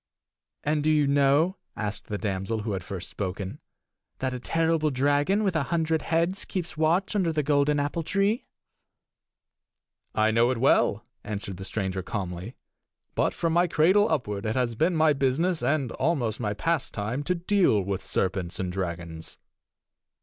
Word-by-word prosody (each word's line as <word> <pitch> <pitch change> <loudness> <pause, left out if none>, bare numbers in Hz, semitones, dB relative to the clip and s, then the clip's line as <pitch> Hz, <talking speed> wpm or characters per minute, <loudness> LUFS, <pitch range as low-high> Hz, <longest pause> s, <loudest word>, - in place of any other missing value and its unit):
"And 150 0 +1
do 155 - +2
you 150 -2 +4
know," 145 +6 +3 0.2
asked 105 -2 -4
the 105 - -3
damsel 100 +2 -2
who 110 - -2
had 95 -2 -3
first 95 -1 -6
spoken, 95 -1 -5 0.6
"that 130 -1 -2
a 125 - -4
terrible 165 +2 +1
dragon 145 +9 +2
with 190 -4 0
a 150 -3 +1
hundred 160 -2 +1
heads 170 +5 0
keeps 175 -4 -4
watch 170 +6 +1
under 185 -5 +2
the 155 -1 0
golden 145 0 +2
apple 145 +4 -1
tree?" 200 - 0 1.7
"I 110 +1 +3
know 115 +2 +4
it 130 - 0
well," 115 -3 +3 0.2
answered 100 -3 -5
the 95 - -7
stranger 95 -2 -2
calmly. 95 +4 -5 0.6
"But - - +1
from 165 -1 0
my 175 +1 +4
cradle 185 +7 +4
upward 105 -9 -1
it 110 - -1
has 125 -2 +1
been 165 +9 +1
my 155 -1 +4
business, 145 +6 +1
and 140 -5 0
almost 125 -10 0
my 105 -3 -2
pastime, 125 -4 -1
to 180 - +1
deal 180 - +3
with 95 0 -3
serpents 95 -2 -2
and 90 -1 -2
dragons." 85 -3 -5
140 Hz, 160 wpm, -27 LUFS, 105-165 Hz, 1.7 s, you